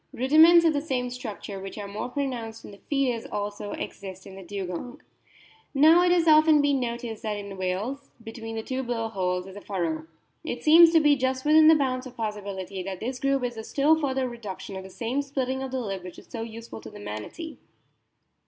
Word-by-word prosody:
Rudiments 320 Hz, +6 st, +6 dB
of 320 Hz, -, +4 dB
the 285 Hz, -, 0 dB
same 250 Hz, -5 st, -2 dB
structure, 215 Hz, -5 st, -6 dB
which 195 Hz, +2 st, -8 dB
are 205 Hz, -, -5 dB
much 200 Hz, -, -11 dB
more 215 Hz, -, -3 dB
pronounced 245 Hz, -5 st, -4 dB
in -, -, -10 dB
the 200 Hz, -, -14 dB
foetus, 260 Hz, -5 st, 0 dB
also 205 Hz, 0 st, -4 dB
exist 190 Hz, -1 st, -7 dB
in 195 Hz, -, -11 dB
the 195 Hz, -, -9 dB
Dugong. 195 Hz, -, -6 dB, 0.8 s
Now 315 Hz, +5 st, +7 dB
it 355 Hz, 0 st, +4 dB
has 345 Hz, -2 st, +3 dB
often 310 Hz, 0 st, +6 dB
been 285 Hz, -1 st, +2 dB
noticed 235 Hz, -2 st, -4 dB
that 215 Hz, -2 st, -2 dB
in 200 Hz, -1 st, -7 dB
whales 195 Hz, +10 st, -3 dB
between 225 Hz, 0 st, -7 dB
the 220 Hz, -, -3 dB
two 260 Hz, +3 st, -3 dB
blow 235 Hz, -3 st, -2 dB
holes 180 Hz, -3 st, -1 dB
is 190 Hz, 0 st, -11 dB
a 205 Hz, -, -8 dB
furrow. 165 Hz, -6 st, -3 dB, 0.4 s
It 245 Hz, -, -5 dB
seems 330 Hz, +2 st, +8 dB
to 325 Hz, -, +7 dB
be 295 Hz, -2 st, +5 dB
just 260 Hz, 0 st, -1 dB
within 310 Hz, +1 st, +7 dB
the 320 Hz, -, +8 dB
bounds 260 Hz, -3 st, -1 dB
of 250 Hz, -, -14 dB
possibility 200 Hz, -3 st, -4 dB
that 190 Hz, 0 st, -5 dB
this 250 Hz, +2 st, -4 dB
groove 275 Hz, -1 st, +1 dB
is 240 Hz, -2 st, -3 dB
a 220 Hz, -, -5 dB
still 290 Hz, +7 st, +3 dB
further 265 Hz, -4 st, -1 dB
reduction 210 Hz, -5 st, -7 dB
of 190 Hz, -, -5 dB
the 190 Hz, -, -11 dB
same 235 Hz, +8 st, -2 dB
splitting 265 Hz, -2 st, -2 dB
of 265 Hz, -, -4 dB
the 260 Hz, 0 st, -2 dB
lip 195 Hz, -5 st, -4 dB
which 180 Hz, -1 st, -9 dB
is -, -, -13 dB
so 230 Hz, -, -7 dB
useful 225 Hz, 0 st, -8 dB
to -, -, -9 dB
the -, -, -12 dB
Manatee. 110 Hz, -, -7 dB
240 Hz, 220 wpm, -26 LUFS, 200-275 Hz, 0.8 s, seems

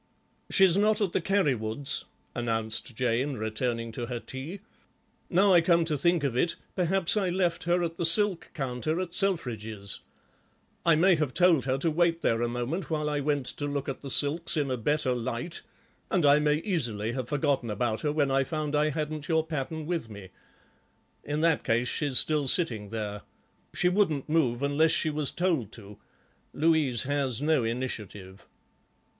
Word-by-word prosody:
"She's 190 Hz, -1 st, +5 dB
not 215 Hz, +1 st, +2 dB
at 200 Hz, -5 st, -1 dB
the -, -, +1 dB
Carrywoods'," 140 Hz, -, 0 dB, 0.3 s
announced 115 Hz, 0 st, -2 dB
Jane, 125 Hz, +3 st, 0 dB
returning 115 Hz, +1 st, -2 dB
to 120 Hz, 0 st, -5 dB
her 120 Hz, -2 st, -4 dB
tea; 145 Hz, +11 st, -8 dB, 0.7 s
"now 190 Hz, +2 st, +4 dB
I 175 Hz, -, +6 dB
come 170 Hz, 0 st, +3 dB
to 155 Hz, -2 st, -1 dB
think 170 Hz, +2 st, +1 dB
of 135 Hz, -4 st, -1 dB
it, 165 Hz, +7 st, +1 dB, 0.2 s
perhaps 185 Hz, +2 st, +2 dB
I 195 Hz, -3 st, +1 dB
left 175 Hz, -2 st, -1 dB
her 175 Hz, +1 st, +2 dB
at 165 Hz, 0 st, -4 dB
the 170 Hz, -, 0 dB
silk 190 Hz, +1 st, +4 dB
counter 135 Hz, +4 st, -2 dB
at 180 Hz, -2 st, -4 dB
Selfridge's. 110 Hz, -, -2 dB, 0.9 s
I 165 Hz, -, +6 dB
may 180 Hz, +3 st, +4 dB
have 150 Hz, -4 st, -2 dB
told 175 Hz, -7 st, +4 dB
her 130 Hz, 0 st, 0 dB
to 160 Hz, +4 st, 0 dB
wait 170 Hz, +1 st, +1 dB
there 115 Hz, 0 st, +1 dB
a 120 Hz, -, +1 dB
moment 130 Hz, +8 st, -3 dB
while 150 Hz, -1 st, -1 dB
I 145 Hz, -, -1 dB
went 145 Hz, -2 st, -1 dB
to 145 Hz, +3 st, -2 dB
look 140 Hz, -1 st, -3 dB
at 135 Hz, -, -5 dB
the 140 Hz, -, -7 dB
silks 155 Hz, +5 st, +2 dB
in 140 Hz, -3 st, 0 dB
a -, -, +1 dB
better 130 Hz, +2 st, 0 dB
light, 120 Hz, +7 st, -4 dB, 0.5 s
and 175 Hz, -5 st, +1 dB
I 145 Hz, +1 st, +6 dB
may 150 Hz, 0 st, +2 dB
easily 120 Hz, -, -2 dB
have 125 Hz, -1 st, -5 dB
forgotten 140 Hz, -4 st, 0 dB
about 110 Hz, +1 st, -2 dB
her 150 Hz, -, 0 dB
when 145 Hz, -2 st, +1 dB
I 135 Hz, 0 st, +3 dB
found 150 Hz, +1 st, -3 dB
I 150 Hz, +1 st, +2 dB
hadn't 150 Hz, 0 st, -4 dB
your 160 Hz, -1 st, +1 dB
pattern 155 Hz, 0 st, -4 dB
with 165 Hz, -8 st, -3 dB
me. 100 Hz, -3 st, -10 dB, 0.9 s
In 150 Hz, +1 st, -2 dB
that 165 Hz, -1 st, +2 dB
case 120 Hz, +1 st, +1 dB
she's 140 Hz, -4 st, 0 dB
still 150 Hz, -3 st, +3 dB
sitting 115 Hz, -, 0 dB
there. 105 Hz, -2 st, -5 dB, 0.5 s
She 180 Hz, -, +1 dB
wouldn't 180 Hz, -7 st, +1 dB
move 140 Hz, -6 st, +1 dB
unless 150 Hz, +3 st, +3 dB
she 155 Hz, -, +1 dB
was 150 Hz, -2 st, +1 dB
told 165 Hz, -, -1 dB
to; 105 Hz, -2 st, -11 dB, 0.6 s
Louise 150 Hz, -6 st, +2 dB
has 135 Hz, -4 st, -1 dB
no 150 Hz, -3 st, +2 dB
initiative." 105 Hz, -5 st, -5 dB
145 Hz, 175 wpm, -28 LUFS, 120-165 Hz, 0.9 s, I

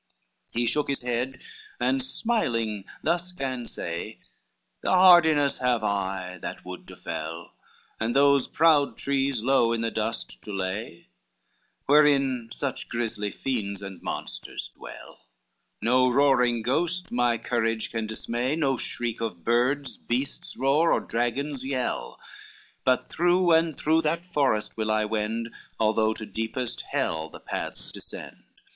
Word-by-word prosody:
XXV -, -, -11 dB
He 120 Hz, -, +2 dB
shook 145 Hz, +6 st, +2 dB
his 140 Hz, -, 0 dB
head, 125 Hz, +2 st, -2 dB, 0.4 s
and 270 Hz, -1 st, +1 dB
smiling 115 Hz, -, -1 dB, 0.2 s
thus 175 Hz, +3 st, 0 dB
gan 130 Hz, -7 st, -4 dB
say, 85 Hz, +6 st, -3 dB, 0.6 s
"The -, -, -2 dB
hardiness 175 Hz, -6 st, +6 dB
have 125 Hz, -3 st, +1 dB
I 95 Hz, -3 st, -2 dB
that -, -, -6 dB
wood -, -, -8 dB
to -, -, -10 dB
fell, 80 Hz, +2 st, -6 dB, 0.4 s
And 115 Hz, +2 st, -1 dB
those 140 Hz, -1 st, +5 dB
proud 155 Hz, -3 st, +3 dB
trees 135 Hz, -4 st, 0 dB
low 125 Hz, -2 st, +3 dB
in 115 Hz, -, -1 dB
the 115 Hz, 0 st, -1 dB
dust 110 Hz, +1 st, -1 dB
to 105 Hz, -, -7 dB
lay 95 Hz, -1 st, -4 dB, 0.8 s
Wherein 140 Hz, -5 st, +4 dB
such 135 Hz, +1 st, -2 dB
grisly 110 Hz, -3 st, -1 dB
fiends 100 Hz, -4 st, -3 dB
and 95 Hz, -2 st, -8 dB
monsters -, -, -5 dB
dwell; -, -, -12 dB, 0.6 s
No 130 Hz, +2 st, +4 dB
roaring 125 Hz, -3 st, +3 dB
ghost 175 Hz, +8 st, 0 dB
my 120 Hz, -1 st, +2 dB
courage 115 Hz, -1 st, -1 dB
can 115 Hz, -1 st, -2 dB
dismay, 120 Hz, +5 st, -2 dB
No 140 Hz, -5 st, +1 dB
shriek 120 Hz, -1 st, -2 dB
of 100 Hz, -7 st, -4 dB
birds, 125 Hz, +4 st, +1 dB
beast's 130 Hz, +3 st, -3 dB
roar, 140 Hz, +6 st, +3 dB
or -, -, +4 dB
dragon's 130 Hz, +4 st, -2 dB
yell; 130 Hz, -2 st, -3 dB, 0.6 s
But 130 Hz, -1 st, +2 dB
through 175 Hz, +1 st, +3 dB
and 160 Hz, -2 st, +3 dB
through 160 Hz, +2 st, +2 dB
that 160 Hz, +1 st, +1 dB
forest 140 Hz, -, 0 dB
will 110 Hz, -1 st, -1 dB
I 110 Hz, 0 st, +2 dB
wend, 110 Hz, +2 st, -2 dB, 0.3 s
Although 110 Hz, 0 st, +2 dB
to 110 Hz, -, -6 dB
deepest 115 Hz, +2 st, -3 dB
hell 80 Hz, 0 st, -1 dB
the -, -, -11 dB
paths -, -, -4 dB
descend." -, -, -4 dB
120 Hz, 140 wpm, -26 LUFS, 110-140 Hz, 0.8 s, hardiness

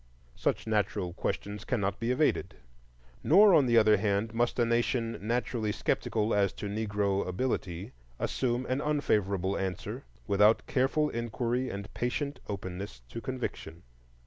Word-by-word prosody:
Such -, -, -1 dB
natural 105 Hz, -4 st, 0 dB
questions 100 Hz, +3 st, -3 dB
cannot 100 Hz, -6 st, -1 dB
be 115 Hz, -, -1 dB
evaded, 125 Hz, -, +1 dB, 0.7 s
nor 200 Hz, +5 st, +7 dB
on 145 Hz, -6 st, +5 dB
the 120 Hz, -1 st, +4 dB
other 110 Hz, -1 st, +6 dB
hand 105 Hz, +2 st, 0 dB
must 120 Hz, +1 st, 0 dB
a 120 Hz, -, +3 dB
Nation 115 Hz, 0 st, 0 dB
naturally 115 Hz, 0 st, -1 dB
skeptical 110 Hz, +1 st, 0 dB
as 100 Hz, -2 st, +2 dB
to -, -, -7 dB
Negro 100 Hz, -2 st, -1 dB
ability 95 Hz, -1 st, -2 dB, 0.3 s
assume 125 Hz, 0 st, -1 dB
an 130 Hz, +2 st, -1 dB
unfavorable 100 Hz, -11 st, +1 dB
answer 95 Hz, -2 st, -4 dB, 0.2 s
without 105 Hz, -, +4 dB
careful 145 Hz, +4 st, +1 dB
inquiry 120 Hz, +2 st, -1 dB
and 100 Hz, +1 st, -7 dB
patient 140 Hz, +4 st, -2 dB
openness 95 Hz, -9 st, -6 dB
to 115 Hz, -, -6 dB
conviction. 125 Hz, -, -5 dB
110 Hz, 135 wpm, -30 LUFS, 100-125 Hz, 0.7 s, nor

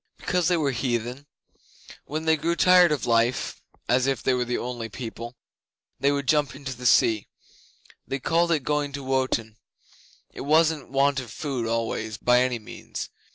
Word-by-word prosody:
'Because 180 Hz, -2 st, 0 dB
they 180 Hz, -1 st, +3 dB
were 145 Hz, -4 st, +1 dB
heathen. 125 Hz, +2 st, -3 dB, 0.8 s
When 155 Hz, +2 st, -4 dB
they 160 Hz, 0 st, +4 dB
grew 165 Hz, +3 st, -1 dB
tired 180 Hz, -1 st, +6 dB
of 145 Hz, -6 st, -1 dB
life 115 Hz, +1 st, +1 dB, 0.3 s
(as 125 Hz, +2 st, +2 dB
if 135 Hz, -4 st, -1 dB
they 130 Hz, -, +2 dB
were 125 Hz, -1 st, 0 dB
the 120 Hz, 0 st, -1 dB
only 120 Hz, -2 st, -5 dB
people!) 120 Hz, +1 st, -7 dB, 0.6 s
they 140 Hz, +1 st, +3 dB
would 140 Hz, -1 st, -2 dB
jump 145 Hz, -1 st, +2 dB
into 135 Hz, -2 st, -6 dB
the 125 Hz, 0 st, -2 dB
sea. 110 Hz, -2 st, +4 dB, 0.8 s
They 135 Hz, -, -2 dB
called 170 Hz, +6 st, +1 dB
it 155 Hz, -5 st, +1 dB
going 145 Hz, 0 st, -1 dB
to 140 Hz, -1 st, -5 dB
Wotan. 130 Hz, -4 st, -1 dB, 0.8 s
It -, -, -8 dB
wasn't 155 Hz, +1 st, +2 dB
want 140 Hz, +1 st, +2 dB
of 125 Hz, -3 st, -7 dB
food 130 Hz, -2 st, -3 dB
always 115 Hz, -1 st, -2 dB
by 125 Hz, 0 st, +4 dB
any 125 Hz, -1 st, +1 dB
means. 110 Hz, -, -8 dB
130 Hz, 170 wpm, -25 LUFS, 120-150 Hz, 0.8 s, tired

